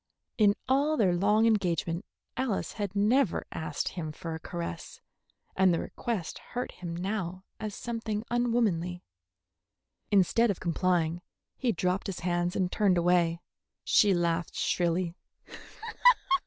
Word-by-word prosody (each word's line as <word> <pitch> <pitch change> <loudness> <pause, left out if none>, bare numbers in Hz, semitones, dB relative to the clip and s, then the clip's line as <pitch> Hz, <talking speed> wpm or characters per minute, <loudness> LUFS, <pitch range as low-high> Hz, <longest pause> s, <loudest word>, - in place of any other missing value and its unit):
In 205 -1 +5
all 285 +4 +2
their 190 -7 +3
long 210 +5 +3
engagement 180 -4 +1 0.3
Alice 250 -5 -1
had 205 -2 -4
never 215 +1 +2
asked 155 -2 -3
him 160 -4 -5
for 165 +2 -6
a 160 - -5
caress, 170 +1 -6 0.6
and 190 -1 +4
the 170 - +1
request 225 -9 -4
hurt 245 0 -5
him 170 -2 -6
now 185 0 -3 0.2
as 215 -2 -4
something 225 -3 -3
unwomanly. 220 -8 +1 1.1
Instead 210 +4 +4
of 200 - -1
complying, 170 -1 0 0.3
he 250 -3 0
dropped 180 0 -1
his 195 - -5
hands 175 +1 0
and 185 -1 0
turned 195 -4 +3
away. 170 -1 +2 0.4
She 205 -3 +4
laughed 170 -2 0
shrilly. 175 0 0
185 Hz, 130 wpm, -29 LUFS, 170-215 Hz, 1.1 s, In